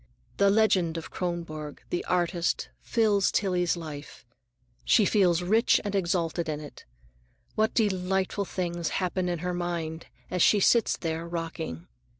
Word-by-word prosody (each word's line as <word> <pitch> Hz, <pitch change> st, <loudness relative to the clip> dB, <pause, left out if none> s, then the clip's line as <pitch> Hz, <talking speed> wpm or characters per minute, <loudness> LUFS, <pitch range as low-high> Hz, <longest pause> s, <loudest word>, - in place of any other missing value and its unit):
The 200 Hz, 0 st, +4 dB
legend 195 Hz, -6 st, +3 dB
of 165 Hz, -, -7 dB
Kronborg, 165 Hz, -4 st, -5 dB
the 175 Hz, -, -1 dB
artist, 175 Hz, -1 st, 0 dB
fills 210 Hz, -4 st, +2 dB
Tillie's 180 Hz, -3 st, +1 dB
life; 150 Hz, -6 st, -9 dB, 0.6 s
she 215 Hz, -, +4 dB
feels 180 Hz, -4 st, +3 dB
rich 220 Hz, +6 st, +4 dB
and 205 Hz, -, -2 dB
exalted 170 Hz, -3 st, 0 dB
in 150 Hz, -1 st, -2 dB
it. 150 Hz, -2 st, -11 dB, 0.7 s
What 220 Hz, +1 st, +1 dB
delightful 190 Hz, -1 st, 0 dB
things 175 Hz, -3 st, -3 dB
happen 185 Hz, -1 st, -1 dB
in 175 Hz, -, -1 dB
her 180 Hz, -, -1 dB
mind 170 Hz, -2 st, -3 dB, 0.2 s
as 180 Hz, -, 0 dB
she 210 Hz, -, +5 dB
sits 230 Hz, +3 st, +3 dB
there 165 Hz, 0 st, -3 dB
rocking! 165 Hz, -, -5 dB
175 Hz, 140 wpm, -27 LUFS, 165-195 Hz, 0.7 s, she